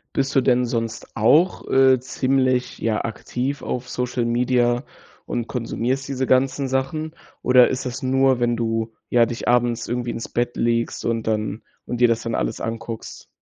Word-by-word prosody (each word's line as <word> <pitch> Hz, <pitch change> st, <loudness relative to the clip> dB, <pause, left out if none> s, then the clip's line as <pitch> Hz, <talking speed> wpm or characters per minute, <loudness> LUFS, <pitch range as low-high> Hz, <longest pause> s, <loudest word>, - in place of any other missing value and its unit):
Bist 135 Hz, 0 st, 0 dB
du 135 Hz, -, +5 dB
denn 125 Hz, -1 st, +3 dB
sonst 115 Hz, -2 st, -4 dB
auch, 150 Hz, -, +3 dB
äh, 130 Hz, -1 st, +5 dB
ziemlich, 130 Hz, 0 st, 0 dB
ja, 110 Hz, -1 st, -1 dB
aktiv 125 Hz, +5 st, -4 dB
auf 125 Hz, 0 st, -4 dB
Social 125 Hz, -1 st, -2 dB
Media 120 Hz, +1 st, +1 dB, 0.4 s
und 120 Hz, -1 st, -3 dB
konsumierst 125 Hz, +2 st, -2 dB
diese 130 Hz, -1 st, -2 dB
ganzen 135 Hz, +1 st, +2 dB
Sachen? 145 Hz, +5 st, -2 dB, 0.3 s
Oder 125 Hz, -1 st, +6 dB
ist 130 Hz, 0 st, -3 dB
das 125 Hz, -, -6 dB
nur, 130 Hz, 0 st, +3 dB
wenn 120 Hz, 0 st, +1 dB
du 115 Hz, -1 st, -2 dB, 0.2 s
ja, 120 Hz, -1 st, +5 dB
dich 120 Hz, 0 st, -6 dB
abends 120 Hz, -1 st, +2 dB
irgendwie 120 Hz, 0 st, -2 dB
ins 115 Hz, -, -6 dB
Bett 120 Hz, 0 st, -1 dB
legst 115 Hz, 0 st, 0 dB
und 115 Hz, -1 st, 0 dB
dann 110 Hz, 0 st, -2 dB, 0.2 s
und 120 Hz, -, -3 dB
dir 120 Hz, -, +6 dB
das 115 Hz, -1 st, +1 dB
dann 115 Hz, -, -3 dB
alles 110 Hz, -, -2 dB
anguckst? 115 Hz, 0 st, -6 dB
120 Hz, 170 wpm, -22 LUFS, 115-130 Hz, 0.4 s, Oder